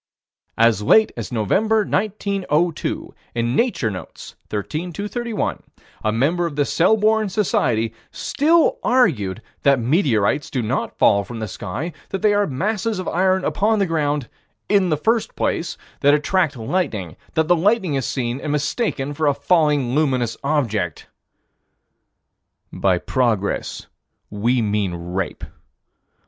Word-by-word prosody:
As 115 Hz, -2 st, +4 dB
late 215 Hz, -, +5 dB
as 115 Hz, 0 st, -6 dB
November, 205 Hz, -, +2 dB
1902, 195 Hz, -6 st, -1 dB, 0.2 s
in 120 Hz, +1 st, 0 dB
Nature 225 Hz, -, +1 dB
Notes, 90 Hz, -, -9 dB, 0.2 s
13 155 Hz, -, -3 dB
231, 215 Hz, +5 st, -3 dB, 0.4 s
a 110 Hz, -, +1 dB
member 160 Hz, +10 st, +1 dB
of 155 Hz, -, -7 dB
the 145 Hz, -1 st, +2 dB
Selborne 215 Hz, +5 st, +3 dB
Society 120 Hz, -, 0 dB, 0.2 s
still 310 Hz, +4 st, +2 dB
argued 120 Hz, -, +2 dB, 0.2 s
that 140 Hz, -1 st, +4 dB
meteorites 130 Hz, -, +1 dB
do 125 Hz, -3 st, -2 dB
not 110 Hz, -, -2 dB
fall 100 Hz, 0 st, +4 dB
from 115 Hz, +4 st, -8 dB
the 110 Hz, -1 st, -4 dB
sky; 105 Hz, -, -5 dB, 0.2 s
that 195 Hz, -, -4 dB
they 210 Hz, -1 st, +4 dB
are 205 Hz, 0 st, +2 dB
masses 205 Hz, -, -1 dB
of 185 Hz, -, -4 dB
iron 185 Hz, +2 st, +1 dB
upon 215 Hz, +2 st, +1 dB
the 200 Hz, -, +2 dB
ground 150 Hz, -5 st, -1 dB, 0.4 s
"in 195 Hz, -3 st, +3 dB
the 155 Hz, -, +1 dB
first 225 Hz, +8 st, 0 dB
place," 170 Hz, -, -1 dB, 0.2 s
that 145 Hz, +1 st, +5 dB
attract 155 Hz, -1 st, +1 dB
lightning; 110 Hz, -, -2 dB, 0.2 s
that 160 Hz, -1 st, +2 dB
the 175 Hz, -, +5 dB
lightning 190 Hz, -1 st, +2 dB
is 135 Hz, -1 st, 0 dB
seen, 120 Hz, -2 st, -2 dB
and 155 Hz, -, -6 dB
is 150 Hz, -, +1 dB
mistaken 145 Hz, -, -2 dB
for 155 Hz, +1 st, 0 dB
a 140 Hz, -, +3 dB
falling, 145 Hz, -4 st, +2 dB
luminous 130 Hz, -6 st, +1 dB
object 115 Hz, -, -1 dB, 1.7 s
By 95 Hz, -2 st, +2 dB
progress 110 Hz, -2 st, -1 dB, 0.5 s
we 115 Hz, +4 st, +1 dB
mean 105 Hz, -4 st, 0 dB
rape. 90 Hz, +2 st, -4 dB
150 Hz, 135 wpm, -21 LUFS, 115-190 Hz, 1.7 s, late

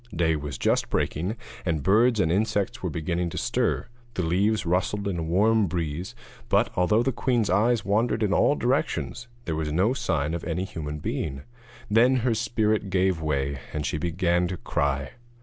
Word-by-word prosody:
Day 80 Hz, -1 st, +2 dB
was 75 Hz, -1 st, -5 dB
just -, -, +1 dB
breaking, 90 Hz, +9 st, -1 dB, 0.3 s
and 80 Hz, -6 st, -1 dB
birds 110 Hz, +4 st, +4 dB
and 80 Hz, -4 st, +2 dB
insects 100 Hz, 0 st, 0 dB
were 90 Hz, -, -2 dB
beginning 85 Hz, +3 st, -2 dB
to -, -, -7 dB
stir; -, -, 0 dB, 0.3 s
the 90 Hz, -, -1 dB
leaves 100 Hz, +5 st, +1 dB
rustled 95 Hz, +4 st, 0 dB
in 90 Hz, -4 st, -2 dB
a -, -, -1 dB
warm 100 Hz, +6 st, +3 dB
breeze; 85 Hz, 0 st, -3 dB, 0.3 s
but, -, -, +3 dB
although 105 Hz, +6 st, +3 dB
the 135 Hz, -, +1 dB
queen's 120 Hz, -5 st, 0 dB
eyes 110 Hz, +3 st, +2 dB
wandered 110 Hz, +3 st, +1 dB
in 100 Hz, -1 st, +1 dB
all 145 Hz, -, +4 dB
directions, 130 Hz, -3 st, -1 dB, 0.2 s
there 80 Hz, -4 st, -2 dB
was 80 Hz, -1 st, -2 dB
no 95 Hz, +10 st, +2 dB
sign 80 Hz, -, -1 dB
of 85 Hz, -, -3 dB
any 85 Hz, +2 st, -2 dB
human 75 Hz, -5 st, -5 dB
being. 70 Hz, -1 st, -3 dB, 0.4 s
Then 115 Hz, +5 st, +4 dB
her 120 Hz, -, +3 dB
spirit 110 Hz, -2 st, 0 dB
gave 95 Hz, -2 st, +1 dB
way, 70 Hz, -3 st, -1 dB
and 75 Hz, -1 st, -2 dB
she 75 Hz, -, -1 dB
began 85 Hz, +1 st, +1 dB
to 90 Hz, +1 st, -4 dB
cry. 70 Hz, -3 st, -1 dB
90 Hz, 180 wpm, -26 LUFS, 80-110 Hz, 0.4 s, birds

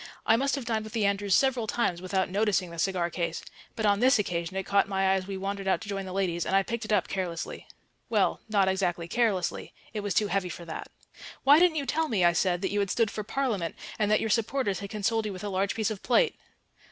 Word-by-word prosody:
I 225 Hz, -, +5 dB
must 275 Hz, +4 st, +1 dB
have 275 Hz, -4 st, -5 dB
dined 220 Hz, -2 st, -1 dB
with 215 Hz, -, -10 dB
the 220 Hz, -3 st, +1 dB
Andrews 200 Hz, -1 st, +2 dB
several 260 Hz, -4 st, +2 dB
times 185 Hz, -7 st, 0 dB
without 190 Hz, 0 st, 0 dB
noticing 195 Hz, -2 st, 0 dB
the 170 Hz, -, -8 dB
cigar 175 Hz, -2 st, 0 dB
case, 170 Hz, -1 st, -3 dB, 0.3 s
but 220 Hz, -, -2 dB
on 200 Hz, -1 st, +3 dB
this 260 Hz, +3 st, +5 dB
occasion 180 Hz, -2 st, -2 dB
it 190 Hz, -, -2 dB
caught 200 Hz, 0 st, +3 dB
my 195 Hz, -1 st, 0 dB
eye 190 Hz, 0 st, +4 dB
as 190 Hz, -1 st, -1 dB
we 195 Hz, -1 st, -4 dB
wandered 195 Hz, 0 st, -4 dB
out 190 Hz, -, +2 dB
to 215 Hz, -, -8 dB
join 195 Hz, -1 st, -3 dB
the -, -, -6 dB
ladies, 180 Hz, -3 st, -1 dB
and 190 Hz, -, 0 dB
I 195 Hz, -, +4 dB
picked 235 Hz, +2 st, -4 dB
it 215 Hz, -, -5 dB
up 205 Hz, -4 st, +2 dB
carelessly. 180 Hz, -3 st, -4 dB, 0.4 s
Well, -, -, +1 dB
not 200 Hz, -3 st, +3 dB
exactly 180 Hz, -3 st, 0 dB
carelessly; 200 Hz, -3 st, -1 dB, 0.2 s
it 215 Hz, -, -2 dB
was 205 Hz, -2 st, -2 dB
too 215 Hz, -, +3 dB
heavy 195 Hz, -2 st, 0 dB
for 170 Hz, -, -8 dB
that. 160 Hz, -, -7 dB, 0.5 s
"Why 290 Hz, +3 st, +7 dB
didn't 345 Hz, -3 st, +4 dB
you 285 Hz, -, -1 dB
tell 320 Hz, +3 st, 0 dB
me," 200 Hz, -9 st, +2 dB
I 175 Hz, -, +5 dB
said, 180 Hz, +1 st, +1 dB
"that 190 Hz, -, 0 dB
you 205 Hz, -, 0 dB
had 200 Hz, -1 st, 0 dB
stood 225 Hz, +2 st, +1 dB
for 215 Hz, -, -4 dB
Parliament 215 Hz, -8 st, -2 dB, 0.2 s
and 210 Hz, -1 st, +2 dB
that 215 Hz, -, +4 dB
your 220 Hz, -, -1 dB
supporters 230 Hz, -3 st, 0 dB
had 200 Hz, -, -6 dB
consoled 215 Hz, +1 st, 0 dB
you 205 Hz, -, -4 dB
with 185 Hz, -, -8 dB
a 205 Hz, -, -3 dB
large 195 Hz, +1 st, 0 dB
piece 220 Hz, -1 st, 0 dB
of 205 Hz, -, -6 dB
plate? 355 Hz, -, +3 dB
200 Hz, 255 wpm, -28 LUFS, 185-220 Hz, 0.5 s, Why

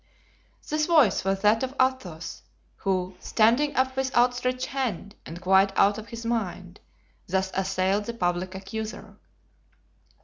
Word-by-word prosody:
This 305 Hz, 0 st, 0 dB
voice 300 Hz, -, +4 dB
was 195 Hz, 0 st, 0 dB
that 215 Hz, +2 st, +4 dB
of 260 Hz, +1 st, -3 dB
Athos, 200 Hz, -12 st, -1 dB, 0.4 s
who, 185 Hz, -1 st, -1 dB
standing 240 Hz, +9 st, +2 dB
up 260 Hz, 0 st, +1 dB
with 265 Hz, 0 st, -2 dB
outstretched 250 Hz, +1 st, +2 dB
hand 230 Hz, -7 st, -3 dB
and 165 Hz, +2 st, -8 dB
quite 190 Hz, +1 st, +4 dB
out 205 Hz, +2 st, +4 dB
of 220 Hz, -, -10 dB
his 230 Hz, +2 st, -8 dB
mind, 190 Hz, -5 st, -3 dB, 0.5 s
thus 190 Hz, +1 st, 0 dB
assailed 190 Hz, +1 st, 0 dB
the 235 Hz, -, -4 dB
public 180 Hz, -1 st, -1 dB
accuser. 215 Hz, +3 st, -7 dB
210 Hz, 135 wpm, -26 LUFS, 190-255 Hz, 0.5 s, voice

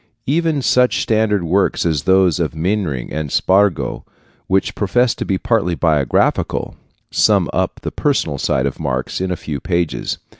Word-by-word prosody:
Even 155 Hz, -1 st, 0 dB
such 125 Hz, 0 st, +3 dB
standard 110 Hz, -3 st, +1 dB
works 90 Hz, +3 st, +1 dB
as 75 Hz, -4 st, 0 dB
those 95 Hz, -3 st, +3 dB
of 80 Hz, -2 st, -1 dB
Mehring 85 Hz, -, -2 dB
and 75 Hz, -2 st, -3 dB
Spargo, 95 Hz, -2 st, +1 dB, 0.4 s
which 95 Hz, 0 st, +1 dB
profess 120 Hz, +4 st, +1 dB
to -, -, -5 dB
be 95 Hz, -, 0 dB
partly 110 Hz, -6 st, 0 dB
biographical, 75 Hz, -6 st, 0 dB, 0.4 s
sum -, -, +3 dB
up -, -, -1 dB
the -, -, -3 dB
personal -, -, -1 dB
side 65 Hz, -, 0 dB
of 70 Hz, -, -3 dB
Marx 65 Hz, +4 st, -3 dB
in 95 Hz, -, -1 dB
a 90 Hz, -, -1 dB
few 75 Hz, -3 st, -5 dB
pages. 85 Hz, +2 st, -2 dB
95 Hz, 155 wpm, -18 LUFS, 80-105 Hz, 0.4 s, such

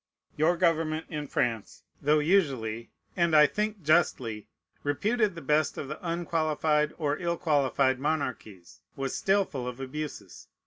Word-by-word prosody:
Your 165 Hz, +4 st, +2 dB
government 160 Hz, -2 st, +1 dB
in 150 Hz, -3 st, -4 dB
France, 115 Hz, -5 st, -2 dB, 0.2 s
though 150 Hz, +2 st, +3 dB
usually, 135 Hz, -, +1 dB, 0.3 s
and 170 Hz, -2 st, +2 dB
I 150 Hz, 0 st, +8 dB
think 210 Hz, +3 st, -2 dB
justly, 130 Hz, -9 st, +1 dB, 0.3 s
reputed 205 Hz, -, 0 dB
the 165 Hz, -, -8 dB
best 150 Hz, +3 st, +1 dB
of 140 Hz, -, -5 dB
the 150 Hz, -, -6 dB
unqualified 155 Hz, -3 st, 0 dB
or 150 Hz, -2 st, -1 dB
ill 170 Hz, -1 st, -1 dB
qualified 140 Hz, -4 st, +2 dB
monarchies, 130 Hz, -, -4 dB, 0.2 s
was 135 Hz, -1 st, -3 dB
still 195 Hz, 0 st, +2 dB
full 130 Hz, -7 st, -6 dB
of 125 Hz, +1 st, -6 dB
abuses. 150 Hz, +3 st, -7 dB
150 Hz, 140 wpm, -28 LUFS, 135-170 Hz, 0.3 s, I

